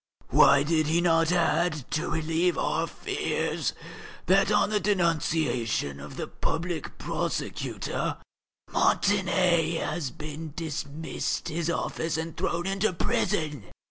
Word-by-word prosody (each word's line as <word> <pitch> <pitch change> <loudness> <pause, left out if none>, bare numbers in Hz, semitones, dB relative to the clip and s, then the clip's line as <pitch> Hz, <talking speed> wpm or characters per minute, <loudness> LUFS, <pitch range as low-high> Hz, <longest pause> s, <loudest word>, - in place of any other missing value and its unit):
Why 140 - +6
did 155 0 +1
he 165 +2 +3
not 165 -1 +3
add, 170 -4 +1
to 155 - -1
relieve 165 +2 +1
our - - 0
fears, - - -2 0.5
that 195 +2 +4
on 205 - +3
the 210 - +2
denunciation 160 - 0
of 70 +1 -9
the - - -2
Public 165 -1 -3
Prosecutor, - - -2 0.5
Montané 180 -4 +2
has 155 -6 -2
been 155 +2 -7
dismissed 160 0 -3
his 165 +1 -2
office 160 -1 -1
and 160 0 -4
thrown 170 +1 -1
into 195 +1 +1
prison?... 150 - -1
165 Hz, 115 wpm, -27 LUFS, 155-175 Hz, 0.5 s, Why